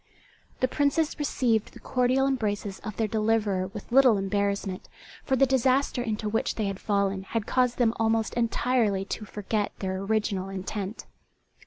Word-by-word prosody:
The 255 - +4
Princes 290 +4 0
received 245 -7 0
the - - -12
cordial 255 +1 +1
embraces 210 -6 -2
of 215 -3 -7
their 225 - +1
deliverer 215 -3 +1
with 200 +3 -10
little 255 -4 +6
embarrassment, 200 -1 -2 0.3
for 265 - +1
the 270 - +5
disaster 260 0 +2
into 220 -2 -2
which 220 +2 0
they 215 - -1
had 195 -1 -3
fallen 200 -2 0
had 210 +3 -3
caused 250 -1 +1
them 230 -2 +3
almost 225 0 +1
entirely 230 -4 +1
to 215 - -5
forget 210 0 -2
their 190 -1 -3
original 195 -2 -1
intent. 195 +2 -5
220 Hz, 155 wpm, -27 LUFS, 200-250 Hz, 0.3 s, little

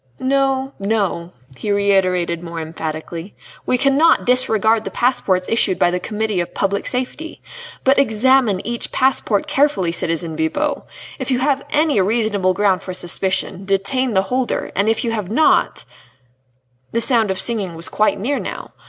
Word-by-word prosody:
"No, 270 0 0
no," 195 -4 -1 0.2
he 210 - -6
reiterated 185 -4 +1
more 170 -1 -6
emphatically, 160 +3 -6 0.3
"we 250 - +2
cannot 280 +5 +3
disregard 225 -3 +2
the - - -4
passports 195 -7 0
issued 215 -5 +1
by 175 - +3
the 180 - -1
Committee 215 -1 -2
of 175 - -4
Public 200 0 -1
Safety. 260 +6 -4 0.4
But 270 +1 +4
examine 240 -4 +2
each 235 +1 -2
passport 255 -6 +1
carefully, 275 - +1
citizen 165 -1 -2
Bibot! 280 - -1 0.3
If - - -4
you 255 - +2
have 275 +1 0
any 300 -8 +2
reasonable 200 -2 +1
ground 195 -2 +2
for 185 -1 -5
suspicion, 185 +1 -1
detain 195 +6 0
the 190 -1 +3
holder, 250 +5 -2
and 200 +3 +2
if 225 - +1
you 235 - -1
have 210 -5 -3
not 300 +8 +2 0.5
" 125 0 -44
The 230 - +1
sound 230 -3 +2
of 190 0 -2
singing 205 -8 -2
was 165 +1 -1
quite 215 -1 +1
near 270 +8 -1
now. - - -7
210 Hz, 160 wpm, -19 LUFS, 185-255 Hz, 0.5 s, But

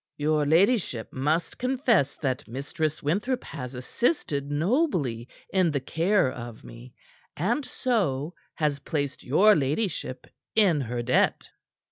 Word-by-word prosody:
"Your 150 0 +1
ladyship 170 - +2
must 155 +5 -1
confess 245 - +2
that 130 -4 -3
Mistress 145 +5 -3
Winthrop 210 - 0
has 125 -4 -7
assisted 140 - -1
nobly 150 - 0 0.3
in 185 -3 +4
the 145 -2 0
care 165 +2 +1
of 120 -2 -8
me, 120 +1 -12 0.4
and 230 - 0
so, 175 - -1 0.2
has 150 -2 0
placed 145 -2 -3
your 200 +11 +5
ladyship 140 - -2 0.3
in 190 -9 +4
her 120 -1 -3
debt." 125 +2 +1
150 Hz, 120 wpm, -26 LUFS, 130-200 Hz, 0.4 s, your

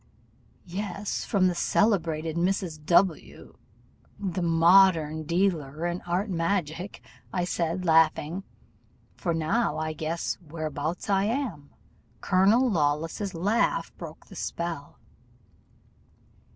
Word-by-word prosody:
"'Yes! 200 +2 -4
from 195 -3 +2
the 180 - +3
celebrated 165 -5 +1
Mrs. 175 -3 -1
W, 175 -1 +1 0.6
the 190 -3 -3
modern 165 -2 +4
dealer 170 -3 0
in 175 +1 -2
art 180 +5 0
magic,' 175 0 -2 0.4
said 170 0 -1
I, - - -7
laughing, 165 +1 +3 0.7
'for, 170 -3 -1
now 165 +9 0
I 155 0 -2
guess 160 +2 -3
whereabouts 155 0 -4
I 195 -1 +2
am. 215 - -3 0.5
Colonel 200 +7 +4
Lawless's 165 +2 -1
laugh 205 +8 0
broke - - -10
the - - -14
spell. 170 -4 -5
170 Hz, 100 wpm, -27 LUFS, 160-195 Hz, 0.7 s, modern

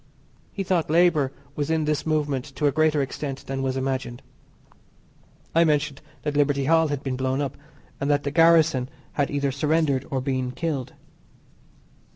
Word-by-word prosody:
He 195 - -3
thought 180 -4 0
labour 160 -4 +3 0.2
was 145 0 -2
in 160 -1 +1
this 150 +1 -1
movement 145 -4 0
to 150 - -1
a 145 - +4
greater 155 -1 +2
extent 135 0 -5
than 135 0 -3
was 135 0 -1
imagined. 130 -2 -3 1.3
I 165 - +5
mentioned 150 -3 0 0.2
that 150 -1 -2
Liberty 145 -1 +2
Hall 160 +2 +4
had 145 -1 -3
been 135 -2 -2
blown 130 +1 -1
up, 140 -2 -2 0.4
and 140 0 -1
that 145 0 +2
the 140 - -2
garrison 160 -5 +4 0.2
had 145 -2 0
either 140 -1 0
surrendered 145 -1 +1
or 135 - -1
been 130 -1 -2
killed. 145 -6 -3
145 Hz, 165 wpm, -24 LUFS, 135-155 Hz, 1.3 s, I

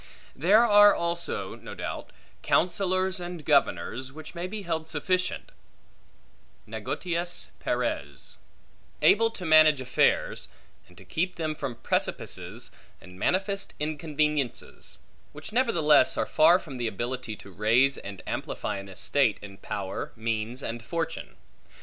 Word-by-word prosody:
There 205 - +5
are 205 -2 +7
also 170 0 -2
(no - - -10
doubt) - - -5 0.3
counsellors 185 +1 +1
and 175 -3 -7
governors 130 - +1
which 155 +3 -10
may 175 +1 -4
be 205 +2 -6
held 160 -2 -2
sufficient 185 - -1 1.2
(negotiis 175 -1 -3
pares), - - -3 0.6
able 225 +2 +5
to 195 -5 -8
manage 155 -2 +6
affairs, 130 -1 +1 0.4
and - - -20
to - - -13
keep 180 +3 -1
them 155 -2 -2
from 130 -5 -5
precipices - - -2 0.3
and 90 0 -14
manifest 195 - 0
inconveniences; 150 -3 -2 0.4
which 150 +7 -9
nevertheless 175 - +4
are - - +1
far 165 +3 +5
from 145 -8 -9
the 120 -1 -1
ability 120 +2 -4
to 100 - -13
raise 115 +8 +3
and 100 -2 -9
amplify - - -3
an 100 0 -8
estate 110 +5 +1
in 100 -1 -10
power, 95 -1 -5
means, 115 +2 -3
and 115 0 -4
fortune. 165 +5 -4
155 Hz, 125 wpm, -27 LUFS, 120-180 Hz, 1.2 s, are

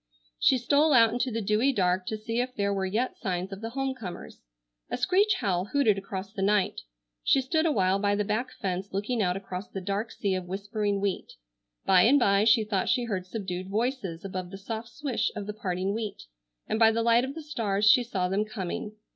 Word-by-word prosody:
She 260 - +4
stole 285 +5 +3
out 230 -3 +6
into 245 +2 0
the 230 -2 -3
dewy 215 +7 +2
dark 185 -5 +1
to 220 - -2
see 225 +2 -3
if 250 0 -4
there 200 0 0
were 190 -1 -1
yet 230 +7 -2
signs 185 -2 -3
of 195 - -8
the 225 - -4
home 270 +2 -2
comers. 180 - -9 0.5
A - - -2
screech 400 +3 +3
owl 185 -3 +1
hooted 225 -2 +2
across 195 0 -6
the 195 - -4
night. 200 0 +1 0.4
She - - +4
stood 315 +5 +1
a - - +2
while 195 -5 +2
by 205 0 +1
the 210 - 0
back 220 +5 -2
fence 190 -4 -4
looking 215 +4 -1
out 180 -1 +1
across 195 0 -6
the 195 - -5
dark 200 +4 -2
sea 200 -3 -1
of 185 -1 -3
whispering 200 +1 -2
wheat. 200 -2 -2 0.5
By 185 -2 +6
and 250 +9 +6
by 200 -5 +3
she 225 0 +5
thought 205 -3 -1
she 245 0 +2
heard 190 -6 -3
subdued 185 -3 -5
voices 210 -5 -2
above 185 -2 -5
the 195 - -8
soft 220 +3 -6
swish 275 -1 -2
of 205 - -4
the 210 - -5
parting 190 -2 -2
wheat, 215 -1 -4 0.4
and 220 - -2
by 225 -1 +7
the 230 +1 0
light 235 +1 +4
of 265 +2 -4
the 320 - -7
stars 215 -8 0
she 235 +4 +7
saw 190 -6 -1
them 195 +3 +1
coming. 210 0 -5
210 Hz, 220 wpm, -28 LUFS, 195-235 Hz, 0.5 s, by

